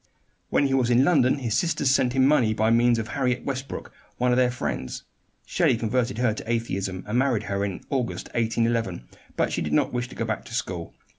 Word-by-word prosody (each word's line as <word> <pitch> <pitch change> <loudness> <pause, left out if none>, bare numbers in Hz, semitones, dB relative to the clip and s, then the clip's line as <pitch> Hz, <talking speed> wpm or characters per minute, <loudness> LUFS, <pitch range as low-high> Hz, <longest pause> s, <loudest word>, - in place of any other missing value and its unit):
When 145 - +2
he 135 - 0
was 130 -3 +2
in 120 +2 +5
London 135 -7 +4
his 120 -5 -2
sisters 150 -5 +1
sent 125 -2 +2
him 130 0 +4
money 125 -7 +3
by 110 +1 +2
means 120 +1 +4
of 110 -1 -3
Harriet 125 -3 -1
Westbrook, 135 0 -5 0.2
one 125 0 +2
of - - +3
their 125 -1 +4
friends. 120 - -4 0.4
Shelley - - +2
converted 120 +1 -1
her 120 -2 +2
to 110 +1 -5
atheism, 95 -5 -2
and 110 +4 0
married 130 -5 +1
her 100 0 -2
in 100 -2 -3
August, 130 -4 -2
1811, 115 - -1 0.3
because - - +1
she - - -1
did 75 -1 -2
not - - +2
wish 125 0 -2
to - - -12
go 115 - -2
back 110 -1 -3
to 115 - -7
school. 90 -9 -4
120 Hz, 215 wpm, -25 LUFS, 110-130 Hz, 0.4 s, in